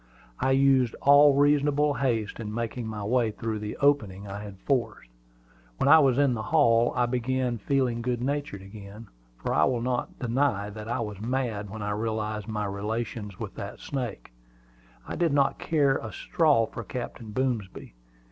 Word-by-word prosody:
I -, -, +1 dB
used 135 Hz, -2 st, +3 dB
all 140 Hz, 0 st, +7 dB
reasonable 145 Hz, +1 st, +3 dB
haste 115 Hz, -7 st, -1 dB
in 105 Hz, -2 st, -5 dB
making 115 Hz, +1 st, -4 dB
my 105 Hz, -2 st, -5 dB
way 120 Hz, +2 st, +2 dB
through 110 Hz, 0 st, -4 dB
the 105 Hz, 0 st, -5 dB
opening 105 Hz, -9 st, +1 dB
I 100 Hz, +1 st, -6 dB
had 100 Hz, -2 st, -9 dB
forced. 125 Hz, -, -2 dB, 0.7 s
When -, -, +1 dB
I 160 Hz, +3 st, +9 dB
was 135 Hz, -4 st, +3 dB
in 140 Hz, -3 st, +3 dB
the 110 Hz, -, -3 dB
hall, 120 Hz, -3 st, +3 dB
I 125 Hz, -1 st, +2 dB
began 125 Hz, 0 st, -1 dB
to -, -, -27 dB
feel 130 Hz, -4 st, +1 dB
good 120 Hz, 0 st, -1 dB
natured 140 Hz, -6 st, -3 dB
again; 100 Hz, +2 st, -11 dB, 0.3 s
for -, -, -3 dB
I -, -, +4 dB
will 120 Hz, -2 st, 0 dB
not 125 Hz, -1 st, -2 dB
deny 120 Hz, -5 st, 0 dB
that 105 Hz, +1 st, -8 dB
I 120 Hz, -, -1 dB
was 105 Hz, -3 st, -5 dB
mad 115 Hz, -4 st, -2 dB
when 110 Hz, +1 st, -6 dB
I 105 Hz, -, -2 dB
realized 110 Hz, -1 st, -3 dB
my 105 Hz, -1 st, -2 dB
relations 105 Hz, 0 st, -4 dB
with 105 Hz, -4 st, -5 dB
that 100 Hz, -1 st, -7 dB
snake. 125 Hz, -, -5 dB, 0.8 s
I -, -, -4 dB
did 170 Hz, -4 st, +1 dB
not 140 Hz, -1 st, +2 dB
care 145 Hz, -4 st, +2 dB
a 110 Hz, -, -7 dB
straw 145 Hz, -6 st, +2 dB
for 115 Hz, -, -8 dB
Captain 120 Hz, -1 st, -6 dB
Boomsby. 115 Hz, -, -3 dB
115 Hz, 175 wpm, -27 LUFS, 105-135 Hz, 0.8 s, I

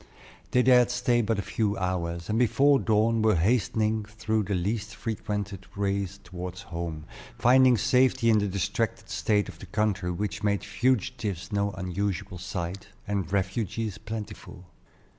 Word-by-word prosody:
They 125 Hz, -, +3 dB
dared 125 Hz, -1 st, +6 dB
stay 125 Hz, -1 st, +2 dB
but 110 Hz, -1 st, 0 dB
a 100 Hz, -, -2 dB
few 105 Hz, -2 st, -1 dB
hours, 85 Hz, -2 st, -2 dB
and 110 Hz, +1 st, 0 dB
before 135 Hz, +4 st, +4 dB
dawn 110 Hz, 0 st, +2 dB
were 110 Hz, -2 st, +4 dB
hastening 110 Hz, +3 st, +1 dB
through 110 Hz, 0 st, -2 dB
the 100 Hz, 0 st, -1 dB
least 105 Hz, +4 st, -2 dB
frequented 105 Hz, -3 st, -4 dB
ways 100 Hz, -1 st, -1 dB
toward 90 Hz, 0 st, -7 dB
home, 85 Hz, -4 st, -5 dB, 0.3 s
finding 130 Hz, 0 st, +5 dB
safety 125 Hz, -1 st, +3 dB
in 110 Hz, -, +5 dB
the 105 Hz, -, 0 dB
distracted 110 Hz, +4 st, -2 dB
state 105 Hz, -2 st, +1 dB
of -, -, -10 dB
the 95 Hz, -, -10 dB
country, 100 Hz, -1 st, 0 dB
which 90 Hz, 0 st, -3 dB
made 100 Hz, -2 st, +1 dB
fugitives 105 Hz, -2 st, -1 dB
no 100 Hz, 0 st, +1 dB
unusual 95 Hz, 0 st, -3 dB
sight, 90 Hz, +1 st, -5 dB, 0.2 s
and 95 Hz, -4 st, -2 dB
refugees 100 Hz, +2 st, -1 dB
plentiful. 110 Hz, -4 st, -7 dB
105 Hz, 145 wpm, -27 LUFS, 95-115 Hz, 0.3 s, dared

